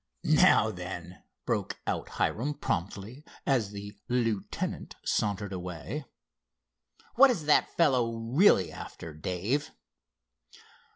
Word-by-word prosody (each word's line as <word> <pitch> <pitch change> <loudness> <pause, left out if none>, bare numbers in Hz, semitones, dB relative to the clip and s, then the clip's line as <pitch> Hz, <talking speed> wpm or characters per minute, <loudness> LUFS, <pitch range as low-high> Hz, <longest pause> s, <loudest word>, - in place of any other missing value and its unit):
"Now, - - +5
then," 90 0 -7 0.2
broke - - -1
out - - -2
Hiram 145 +7 0
promptly 105 - -3 0.2
as 125 -7 +2
the 100 0 -8 0.2
lieutenant 115 -5 -2
sauntered 100 -1 0
away, 90 - -5 1.1
"what 275 +3 +7
is 185 -12 -1
that 150 - +3
fellow 125 -8 +3
really 115 - +4
after, 80 -2 -8
Dave?" 95 - -2
110 Hz, 100 wpm, -29 LUFS, 95-140 Hz, 1.1 s, what